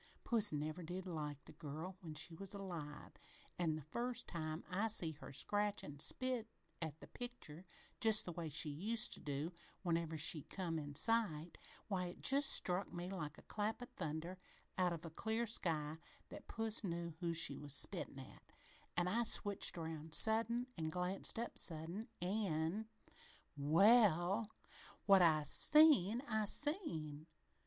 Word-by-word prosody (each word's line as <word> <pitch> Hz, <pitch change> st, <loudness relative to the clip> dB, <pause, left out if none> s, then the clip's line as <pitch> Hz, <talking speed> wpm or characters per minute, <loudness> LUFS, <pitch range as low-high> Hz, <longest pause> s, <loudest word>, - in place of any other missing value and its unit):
Puss 220 Hz, -3 st, +4 dB
never 155 Hz, +3 st, -4 dB
did 175 Hz, +3 st, -6 dB
like 150 Hz, -5 st, -5 dB
the -, -, -12 dB
girl 160 Hz, +4 st, -7 dB
when 160 Hz, -4 st, -8 dB
she 165 Hz, +3 st, -1 dB
was 195 Hz, +4 st, -6 dB
alive, 170 Hz, -7 st, -7 dB, 0.5 s
an' 165 Hz, -3 st, 0 dB
the 155 Hz, -, -7 dB
first 240 Hz, -, -2 dB
time 155 Hz, -1 st, -5 dB
I 200 Hz, +4 st, -1 dB
see 180 Hz, -7 st, +1 dB
her 150 Hz, -2 st, -11 dB
scratch 205 Hz, +9 st, 0 dB
an' 145 Hz, -1 st, -9 dB
spit 250 Hz, -, +2 dB, 0.3 s
at 160 Hz, -1 st, -5 dB
the -, -, -11 dB
picture, 190 Hz, -9 st, -8 dB, 0.3 s
just 220 Hz, -3 st, +4 dB
the 175 Hz, -, -5 dB
way 165 Hz, -1 st, -5 dB
she 155 Hz, +1 st, 0 dB
used 215 Hz, +10 st, +1 dB
to -, -, -4 dB
do 145 Hz, +4 st, -4 dB, 0.3 s
whenever 165 Hz, -2 st, -1 dB
she 155 Hz, 0 st, +1 dB
come 165 Hz, 0 st, -4 dB
in 145 Hz, -1 st, -8 dB
sight, 175 Hz, -4 st, +1 dB, 0.3 s
why, 185 Hz, -3 st, -2 dB
it 175 Hz, -, -8 dB
just 275 Hz, +1 st, +4 dB
struck 180 Hz, -4 st, +2 dB
me 175 Hz, +1 st, -6 dB
like 155 Hz, -5 st, -5 dB
a -, -, -15 dB
clap 215 Hz, +2 st, -3 dB
o' 245 Hz, -, -6 dB
thunder 165 Hz, +2 st, -5 dB, 0.4 s
out 180 Hz, -1 st, +1 dB
of 170 Hz, 0 st, -6 dB
a 165 Hz, -, -7 dB
clear 220 Hz, +7 st, -2 dB
sky 160 Hz, -8 st, 0 dB, 0.3 s
that -, -, -11 dB
puss 225 Hz, 0 st, -1 dB
knew 170 Hz, -3 st, -4 dB
who 170 Hz, -2 st, -1 dB
she 165 Hz, -4 st, +1 dB
was 145 Hz, -2 st, -3 dB
a -, -, +8 dB
spittin' -, -, +2 dB
at -, -, -11 dB, 0.6 s
an' 175 Hz, 0 st, +2 dB
I 225 Hz, +6 st, +1 dB
switched 205 Hz, -5 st, +3 dB
around 160 Hz, -1 st, -3 dB
sudden 230 Hz, +2 st, +6 dB
an' 160 Hz, -1 st, -2 dB
glanced 180 Hz, +6 st, -1 dB
up 235 Hz, +1 st, -3 dB
sudden 170 Hz, +6 st, -1 dB, 0.2 s
an' 190 Hz, 0 st, -1 dB, 0.7 s
"Well, 195 Hz, +5 st, +4 dB, 0.6 s
what 195 Hz, -2 st, +6 dB
I 155 Hz, -3 st, +4 dB
seen, 250 Hz, -, +5 dB
I 220 Hz, -3 st, 0 dB
seen! 165 Hz, -, 0 dB
175 Hz, 165 wpm, -39 LUFS, 155-215 Hz, 0.7 s, a